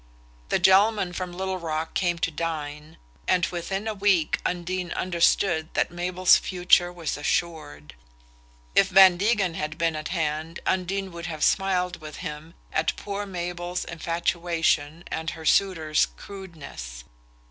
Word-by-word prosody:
The - - +3
gentleman 190 +1 +4
from 180 0 -4
Little 190 +1 -3
Rock 160 -1 -3
came 175 -2 0
to 165 - -5
dine, 155 -1 -5 0.3
and 180 -2 +3
within 195 +4 -4
a 220 - -1
week 195 -6 +2
Undine 180 0 -2
understood 170 -2 +1
that - - +1
Mabel's 180 +1 +4
future 180 -1 +3
was 170 -4 -4
assured. 145 - -3 0.8
If 195 - +5
Van 190 -1 +7
Degen 200 -3 +1
had 155 -1 -4
been 165 -1 0
at 155 0 -4
hand 160 -1 -2
Undine 190 +1 -1
would 170 0 -7
have 155 -3 -4
smiled 180 -3 +1
with 155 -1 -8
him 150 +3 -7 0.2
at 160 +1 +1
poor 205 0 -5
Mabel's 175 -1 -4
infatuation 170 -2 -1
and 160 +1 -2
her 160 -1 -8
suitor's 160 -5 +3
crudeness. 155 - -10
175 Hz, 135 wpm, -25 LUFS, 160-185 Hz, 0.8 s, Van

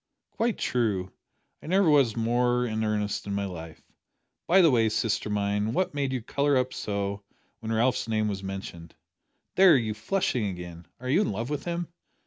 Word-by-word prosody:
"Quite 230 -1 -1
true; 100 -7 -1 0.5
I - - -11
never 190 +2 +3
was 140 -7 +4
more 120 +2 +1
in 110 -1 -2
earnest 105 -1 -1
in 100 - -2
my 100 0 -1
life. 85 -4 -8 0.6
By 190 +3 +6
the 165 -4 +6
way, 115 -3 +3
sister 110 -1 -1
mine, 105 +1 0
what 185 +4 0
made 140 -2 -1
you 130 -3 -3
colour 140 +3 +1
up 130 0 0
so 100 -1 -3 0.4
when 115 -1 -5
Ralph's 120 +2 +1
name 110 -1 0
was 100 -2 -3
mentioned? 95 -4 -7 0.6
There, 185 -6 +7
you're 110 -3 -1
flushing 120 - -1
again! 90 -2 -7
Are 125 - -7
you 150 +10 +3
in - - 0
love 115 +7 -4
with 150 - -3
him?" 170 -1 -2
115 Hz, 180 wpm, -27 LUFS, 100-135 Hz, 0.6 s, There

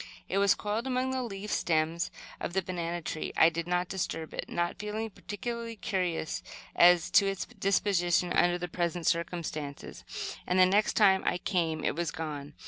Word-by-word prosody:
It 195 - 0
was 200 -1 +5
coiled 215 +4 -2
among 260 0 0
the 260 0 -1
leaf 210 -3 -5
stems 160 0 +1 0.3
of - - -4
the 190 0 +1
banana 175 -1 -3
tree. 155 - -3
I 160 - +7
did 170 0 -4
not 180 0 +1
disturb 165 -4 -3
it, - - -5
not 175 +1 -1
feeling 215 +2 -3
particularly 230 +4 -5
curious 180 -7 -2 0.3
as 175 -1 +6
to 200 - +6
its 195 -1 -2
disposition 190 -5 +1
under 175 0 +3
the 180 0 -4
present 175 0 -2
circumstances; 165 -4 -3 0.4
and 180 - +1
the 185 - +8
next 205 +3 +3
time 195 -3 +5
I - - +1
came 165 -5 -1
it - - 0
was 170 0 -1
gone. 150 -2 -6
180 Hz, 175 wpm, -30 LUFS, 170-200 Hz, 0.4 s, the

